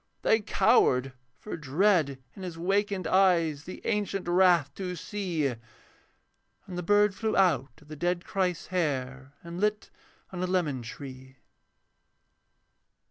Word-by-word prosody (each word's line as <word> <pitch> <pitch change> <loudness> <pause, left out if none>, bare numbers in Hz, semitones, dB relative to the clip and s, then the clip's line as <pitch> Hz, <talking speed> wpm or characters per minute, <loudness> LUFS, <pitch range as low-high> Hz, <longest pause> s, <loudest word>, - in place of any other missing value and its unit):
They 220 - +4
cowered, 190 - +3 0.2
for 210 - -7
dread 160 -1 +2 0.2
in 195 - -10
his 180 -3 -6
wakened 195 +1 0
eyes 165 -5 +2
The 185 - -9
ancient 200 -3 -1
wrath 175 -5 +4
to 180 0 -5
see; 175 -3 -3
And 125 -4 -2 1.2
the 180 - -2
bird 205 +3 +3
flew 220 +2 -1
out 145 -8 +2
of - - -22
the 155 - -8
dead 175 +3 -1
Christ's 180 -3 -2
hair, 135 -5 -2
And 170 +1 -7
lit 210 0 0 0.4
on 180 -2 -5
a 185 - 0
lemon 165 -8 0
tree. 130 +2 -10
175 Hz, 135 wpm, -28 LUFS, 145-195 Hz, 1.2 s, They